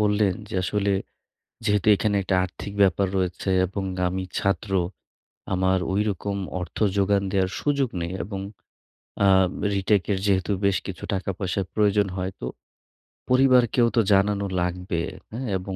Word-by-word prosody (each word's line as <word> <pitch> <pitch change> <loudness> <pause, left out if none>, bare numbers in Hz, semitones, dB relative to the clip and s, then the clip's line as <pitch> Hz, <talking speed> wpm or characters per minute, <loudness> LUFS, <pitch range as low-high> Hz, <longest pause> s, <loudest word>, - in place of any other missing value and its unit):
বললেন 105 -2 +2
যে, - - -8
আসলে 100 +1 0 0.7
যেহেতু 105 -2 +1
এখানে 100 +1 0
একটা 95 - +1
আর্থিক 95 +2 -7
ব্যাপার 95 0 +4
রয়েছে, 90 +1 -2 0.2
এবং 95 +2 -4 0.2
আমি 95 +1 -2
ছাত্র। 100 +1 -1 0.8
আমার 95 0 +2
ওই 100 - +2
রকম 100 +1 -3 0.3
অর্থ 90 - -7 0.2
যোগান 100 0 +3
দেয়ার 95 -2 +1
সুযোগ 140 -3 +1
নেই। 85 +1 -3
এবং 100 +1 -5 0.9
আ - - +6 0.5
রিটাকের 100 0 +1
যেহেতু 95 -3 +1 0.2
বেশ 100 -1 +3
কিছু 95 -4 -7
টাকা-পয়সার 95 0 -2
প্রয়োজন 105 -1 +3
হয়, 95 0 -2
তো - - -4 0.8
পরিবারকেও 125 -2 +4
তো 115 - +5
জানানো 100 +1 +2 0.2
লাগবে। 90 0 -2 0.3
হ্যাঁ? 125 +3 -4
এবং 95 +1 -6
100 Hz, 135 wpm, -24 LUFS, 95-105 Hz, 0.9 s, আ